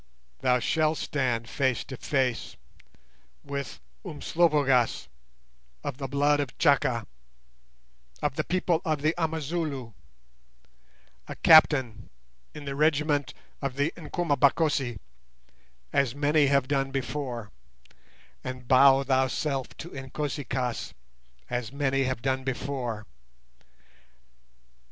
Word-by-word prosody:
"Thou 125 -1 +3
shalt 155 +4 +1
stand 125 -5 -1
face 130 -1 0
to 130 - -8
face 130 -2 -1 0.9
with 140 -2 -5 0.2
Umslopogaas, 145 -6 +1 0.8
of 125 - -5
the 135 - -3
blood 145 +2 +2
of 140 -4 -3
Chaka, 130 -7 +2 1.1
of - - -1
the - - 0
people 175 -2 0
of 155 -5 -1
the 155 +1 +3
Amazulu, 155 -6 -3 1.3
a - - -6
captain 130 -9 +5 0.5
in 150 -1 -8
the 140 - -3
regiment 150 -1 +1 0.3
of 140 -2 -3
the 145 +3 0
Nkomabakosi, 145 - +1 1.0
as 135 -2 +2
many 145 0 +3
have 140 -1 +2
done 135 -1 0
before, 125 -4 -4 0.9
and 130 -1 -6
bow 135 +1 +6
thyself 135 +1 0
to 170 - -8
Inkosi 140 +1 -4
kaas, 125 -2 -3 0.5
as 120 -2 -3
many 135 -1 0
have 130 -2 -3
done 130 -1 0
before. 125 -4 -3
140 Hz, 105 wpm, -27 LUFS, 130-150 Hz, 1.3 s, bow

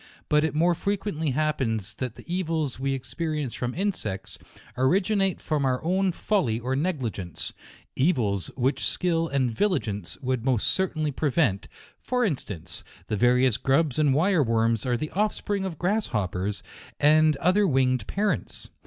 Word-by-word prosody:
But 150 0 +4
it 160 - -1
more 170 +3 +4
frequently 195 -4 -2
happens 125 -8 -1
that 125 -3 -5
the - - -12
evils 165 -7 -2
we 135 0 0
experience 150 0 -3
trom 125 +4 -3
insects, 145 - -3 0.4
originate 190 - +2
from 155 -2 -1
oui 130 -2 +2
own 185 +3 +2
folly 165 - 0
or 130 +2 -2
negligence; 130 - -3 0.4
evils 115 - +1
which 130 +2 0
skill 165 -2 +1
and 135 -5 0
vigilance 110 - -1
would 130 -4 -1
most 125 -4 +1
certainly 155 -5 0
prevent; 135 - +1 0.3
for 250 -1 0
instance, 110 - -5 0.3
the - - 0
various 125 +2 +3
grubs 135 +2 +1
and 145 -3 +3
wire 175 +2 +3
worms 115 -1 +1
are 120 -1 +1
the 155 +5 -4
offspring 205 0 -1
of 175 -5 -4
grasshoppers, 105 - -1 0.4
and 155 0 +5
othei 185 +3 +3
winged 130 -5 +2
parents. 205 +1 -2
145 Hz, 145 wpm, -26 LUFS, 120-175 Hz, 0.4 s, and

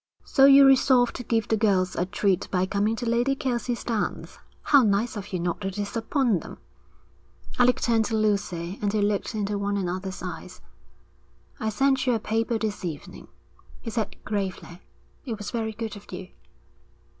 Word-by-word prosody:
'So 270 - +5
you 275 0 +8
resolved 260 -2 +4
to - - -5
give 225 -2 0
the 220 - +2
girls 195 -4 +1
a 180 - -1
treat 190 -1 0
by 185 -1 +1
coming 205 +3 0
to 240 - -5
Lady 240 +4 +2
Kelsey's 245 -3 -2
dance? 225 -3 -3 0.2
How 285 -2 +6
nice 215 +1 +1
of 205 -1 -7
you 180 - -2
not 175 0 -2
to 195 - -2
disappoint 220 - -1
them!' - - -10 1.0
Alec 250 0 +4
turned 225 -2 +2
to 220 -1 -1
Lucy, 200 -4 -1
and 205 -1 0
they 215 - 0
looked 205 +2 -1
into 205 -1 -2
one 200 0 -1
another's 185 0 -4
eyes. 180 0 -7 1.0
'I 220 - -1
sent 265 +4 +1
you 250 - +4
a - - -1
paper 225 +2 -1
this 215 -2 -3
evening,' 160 -5 -7 0.5
he 230 - -6
said 220 -3 -2
gravely. 190 -3 -4 0.4
'It 230 -6 -4
was 205 - -6
very 225 -2 -2
good 220 -1 -5
of 205 - -13
you.' 185 0 -7
215 Hz, 175 wpm, -25 LUFS, 195-235 Hz, 1.0 s, you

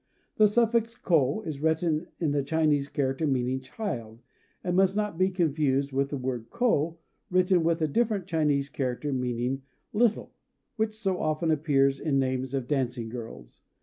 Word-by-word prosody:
This 210 -1 +4
suffix 230 -1 +2
ko 160 - +2
is 155 -4 -5
written 160 +1 +1
with 160 -4 +1
the 145 0 +1
Chinese 145 -1 +1
character 135 +2 -1
meaning 130 -1 0
"child," 125 - -6 0.4
and 180 -1 -1
must 190 +1 +3
not 210 -4 -1
be 185 +2 +2
confused 150 -6 +1
with 135 +1 0
the 145 - -3
word 125 -3 -4
ko, 170 - +1 0.3
written 180 -1 +3
with 165 0 +1
a - - +3
different 210 +3 0
Chinese 150 -5 +1
character, 135 +1 -3
and 130 -2 -1
meaning 125 +2 -2 0.3
"little," 220 0 +1 0.4
which 215 -1 -1
so 195 -4 -1
often 155 +1 0
appears 140 -3 +2
in 145 -4 0
the 135 - +2
names 130 +1 -2
of 130 -3 -2
dancing 125 -5 -1
girls. 110 - -9
150 Hz, 170 wpm, -28 LUFS, 130-180 Hz, 0.4 s, This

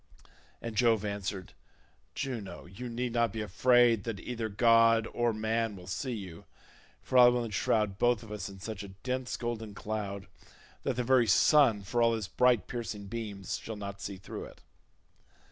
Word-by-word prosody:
And 115 -2 -5
Jove 115 -3 +3
answered, 100 -2 -4 0.6
"Juno, 110 -9 -5
you 95 +8 -8
need 120 0 -3
not 115 -1 +2
be 110 - -4
afraid 120 +1 +4
that 115 -4 -4
either 115 +1 -4
god 115 +1 +5
or 120 -1 +1
man 110 0 -1
will 90 -2 -11
see 125 +8 -3
you, 95 -6 -9 0.6
for 130 - +3
I 125 - +10
will 120 -1 +2
enshroud 105 -2 0
both 120 -3 +2
of 110 - -11
us 105 -1 -5
in 95 -1 -11
such 110 0 -6
a 100 - -7 0.2
dense 130 0 -2
golden 115 -3 -4
cloud, 100 -2 -4 0.6
that 135 - -1
the 125 - -1
very 125 -1 +4
sun 115 0 +5
for 120 +5 -1
all 115 0 +4
his 110 -4 -4
bright 125 +3 +3
piercing 110 -4 -5
beams 105 -4 -4
shall 110 - -6
not 100 -1 -7
see 100 -1 -5
through 95 - -7
it." - - -14
110 Hz, 175 wpm, -30 LUFS, 100-120 Hz, 0.6 s, I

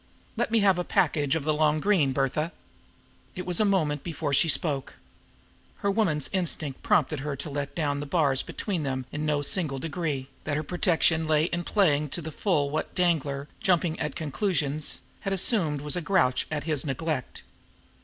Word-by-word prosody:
Let - - 0
me 225 -1 +3
have 195 -3 +4
a - - 0
package 145 -4 +1
of 160 - -1
the 155 +1 +1
long 155 0 +2
green, 170 -7 +3
Bertha." 140 +5 -1 0.8
It 180 - -5
was 180 -2 +1
a 215 - +4
moment 155 -8 +1
before 155 -3 -3
she 160 +4 +4
spoke. 140 -2 0 0.9
Her 200 - +4
woman's 175 -9 +1
instinct 160 -7 -1
prompted 155 - +2
her 145 +1 -3
to 140 +3 -6
let 140 0 -4
down 145 -4 0
the 145 - -5
bars 140 -4 +2
between 190 -6 -3
them 130 -3 -2
in 150 +1 -3
no 145 -1 +1
single 145 -3 0
degree, 150 -3 -3 0.2
that 145 -2 -1
her 155 - -2
protection 165 -1 +2
lay 155 -1 +3
in 175 +1 -1
playing 155 -8 +2
up 145 - -10
to 175 - -3
the 160 - -5
full 150 -5 0
what 155 - -3
Danglar, 150 -6 0
jumping 175 -3 +1
at 150 - -3
conclusions, 155 -1 -1 0.2
had 195 - -2
assumed 175 - +1
was 150 +2 -1
a 180 - -1
grouch 150 -7 +2
at 150 -2 -3
his 155 -3 0
neglect. 145 -1 -3
155 Hz, 185 wpm, -27 LUFS, 145-175 Hz, 0.9 s, have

